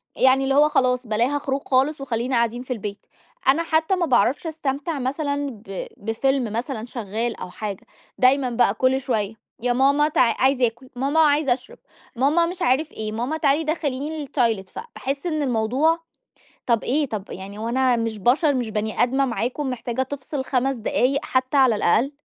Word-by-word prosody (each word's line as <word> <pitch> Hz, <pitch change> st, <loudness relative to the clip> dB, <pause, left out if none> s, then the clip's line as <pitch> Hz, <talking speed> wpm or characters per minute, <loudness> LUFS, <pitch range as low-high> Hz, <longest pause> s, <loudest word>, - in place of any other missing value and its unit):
يعني 265 Hz, +1 st, +4 dB
اللي 270 Hz, 0 st, +1 dB
هو 300 Hz, +1 st, +5 dB
خلاص 250 Hz, -4 st, +1 dB
بلاها 240 Hz, +7 st, +1 dB
خروج 275 Hz, 0 st, -2 dB
خالص 275 Hz, +3 st, +2 dB
وخلينا 250 Hz, 0 st, -1 dB
قاعدين 235 Hz, +1 st, +1 dB
في 255 Hz, 0 st, -4 dB
البيت. 205 Hz, -2 st, -7 dB, 0.4 s
أنا 285 Hz, +5 st, +4 dB
حتى 325 Hz, +3 st, +1 dB
ما 355 Hz, -, 0 dB
باعرفش 265 Hz, -, +2 dB
أستمتع 295 Hz, -1 st, -3 dB
مثلًا 285 Hz, +2 st, -2 dB
ب 200 Hz, -4 st, -7 dB
بفيلم 225 Hz, +2 st, -1 dB
مثلًا 235 Hz, -1 st, -3 dB
شغال 230 Hz, 0 st, -3 dB
أو -, -, -7 dB
حاجة، 200 Hz, 0 st, -6 dB, 0.3 s
دايمًا 255 Hz, 0 st, +3 dB
بقى 235 Hz, -4 st, +2 dB
كل 260 Hz, +3 st, +2 dB
شوية 220 Hz, -5 st, -1 dB, 0.3 s
يا 245 Hz, 0 st, +1 dB
ماما 280 Hz, +4 st, +3 dB
تع 305 Hz, -, +2 dB, 0.2 s
عايز 265 Hz, 0 st, +3 dB
آكل، 245 Hz, +2 st, -1 dB
ماما 275 Hz, +5 st, 0 dB
عايز 295 Hz, -2 st, +4 dB
أشرب، 260 Hz, -, -2 dB, 0.4 s
ماما 295 Hz, +7 st, +3 dB
مش 360 Hz, +2 st, -6 dB
عارف 285 Hz, +3 st, +1 dB
إيه، 215 Hz, -1 st, -5 dB
ماما 245 Hz, +8 st, -2 dB
تعالي 295 Hz, +1 st, +2 dB
دخليني 300 Hz, -1 st, -2 dB
الtoilettes 225 Hz, -8 st, 0 dB
فباحس 285 Hz, -, -5 dB
إن 310 Hz, -3 st, -1 dB
الموضوع 265 Hz, +6 st, +1 dB, 0.7 s
طَب 235 Hz, -3 st, +2 dB
إيه؟! 290 Hz, +4 st, +1 dB
طَب 210 Hz, -3 st, -4 dB
يعني 195 Hz, +2 st, -8 dB
هو 225 Hz, +2 st, -3 dB
أنا 255 Hz, 0 st, +2 dB
مش 225 Hz, -1 st, -2 dB
بشر، 275 Hz, -, +3 dB
مش 245 Hz, -4 st, -2 dB
بني 215 Hz, 0 st, 0 dB
آدمة 270 Hz, +3 st, +2 dB
معاكم 250 Hz, +3 st, -2 dB
محتاجة 245 Hz, 0 st, -3 dB
تفصل 270 Hz, +1 st, -5 dB
5 265 Hz, +1 st, 0 dB
دقايق 255 Hz, +4 st, +1 dB
حتى 255 Hz, +2 st, 0 dB
على 260 Hz, -4 st, +5 dB
الأقل؟! 225 Hz, +7 st, +2 dB
260 Hz, 175 wpm, -23 LUFS, 235-285 Hz, 0.7 s, هو